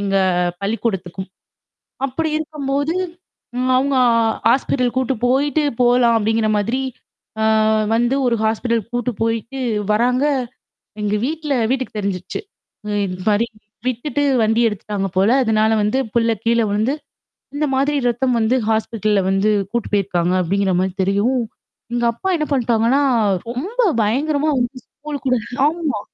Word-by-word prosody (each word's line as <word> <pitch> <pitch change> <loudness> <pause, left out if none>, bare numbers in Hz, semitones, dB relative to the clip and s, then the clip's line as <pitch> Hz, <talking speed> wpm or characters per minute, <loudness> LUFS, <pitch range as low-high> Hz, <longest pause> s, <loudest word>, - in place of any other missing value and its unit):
எங்க 195 -1 0 0.4
பள்ளிக்கூடத்துக்கும். 195 -3 -3 0.8
அப்படி 310 +4 -2
இருக்கும்போது, 290 0 -2 0.8
அவங்க, 275 +1 +1
ஆ 240 - +4 0.4
ஹாஸ்பிட்டல் 255 -1 +1
கூட்டு 260 0 +1
போயிட்டு 285 +4 +2 0.2
போகலாம் 240 -1 +4
அப்படிங்கிற 220 0 +1
மாதிரி 240 +6 -1 0.6
ஆ, - - +2 0.5
வந்து 240 +3 +2
ஒரு 240 -1 +2
ஹாஸ்பிட்டல் 225 +1 0
கூட்டு 245 0 -1
போயிட்டு 230 +3 -2 0.3
வர்றாங்க, 250 +5 +2 0.8
எங்க 210 0 0
வீட்ல 300 0 -2 0.2
வீட்டுக்கு 260 -4 -2
தெரிஞ்சிருச்சு. 195 -3 -3 0.7
இந்த 185 0 -6
மாதிரி 210 +3 +2 0.4
விட்டுட்டு 270 +4 -2 0.2
வண்டி 225 +2 +2
எடுத்துட்டாங்க 205 -1 -3
போல, 195 +4 +4
அதனால 220 -1 +2
வந்து 210 +6 +1 0.2
பிள்ளை 230 -1 +2
கீழே 230 0 +3
விழுந்து, 215 +7 0 0.6
இந்த 300 +1 0
மாதிரி 280 +2 +1
ரத்தம் 245 +1 +1
வந்து 225 +3 +2
ஹாஸ்பிட்டல்ல 215 -2 +1
வந்து 195 +2 +2 0.2
கூட்டு 235 -1 -2
போயிருக்காங்க 180 -3 +1
அப்படிங்கிற 190 +2 0
மாதிரி 190 -1 -1
தெரியவும் 215 +6 +1 0.5
எங்க 240 0 0
அப்பா 380 +11 -4
என்ன 305 -2 -1
பண்ணிட்டாங்கன்னா, 240 +1 +2 0.5
ரொம்ப 385 - -2 0.2
பயங்கரமா 285 +7 +1
வந்து, 245 +2 -2
ஸ்கூல் 295 -1 -8
கூட 255 - +3 0.3
ஆமா. 310 -8 -2
235 Hz, 125 wpm, -19 LUFS, 210-270 Hz, 0.8 s, ஆ